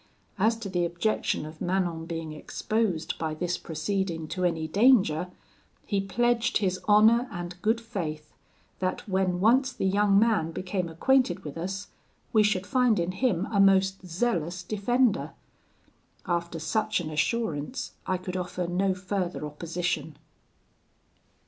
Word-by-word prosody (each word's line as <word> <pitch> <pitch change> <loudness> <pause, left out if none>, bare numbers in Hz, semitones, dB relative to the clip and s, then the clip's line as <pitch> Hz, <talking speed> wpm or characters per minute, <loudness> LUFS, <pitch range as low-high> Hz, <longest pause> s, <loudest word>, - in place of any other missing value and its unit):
As 220 +4 +3
to 225 -3 -6
the 180 -2 0
objection 170 -1 -1
of 155 +1 -10
Manon 175 -3 -1
being 165 -2 -5
exposed 185 +1 -2
by 160 -1 -2
this 180 +2 -2
proceeding 165 0 -2
to 185 - -3
any 165 -3 0
danger, 195 -4 +4 0.6
he 200 -2 0
pledged 235 +3 +1
his 185 -3 0
honour 225 +4 +6
and 175 -1 -6
good 220 +3 +2
faith, 165 -10 -5 0.5
that 185 +3 -2
when 190 -2 +1
once 255 +7 +4
the 245 - -3
young 200 +1 +3
man 210 -7 +3
became 185 -1 -3
acquainted 245 +3 +2
with 150 - -7
us, 190 +4 -4 0.4
we 215 - +6
should 205 -3 +1
find 250 -6 +3
in 170 +1 0
him 195 -3 0
a 200 - +1
most 195 -1 +4
zealous 180 -2 -1
defender. 220 +4 +1 0.9
After 170 -1 -2
such 215 +7 0
an 160 -3 -5
assurance, 220 - -1 0.2
I 185 - +1
could 180 0 -6
offer 180 0 -3
no 185 +2 +1
further 185 -3 -3
opposition. 160 0 -3
185 Hz, 140 wpm, -27 LUFS, 170-215 Hz, 0.9 s, honour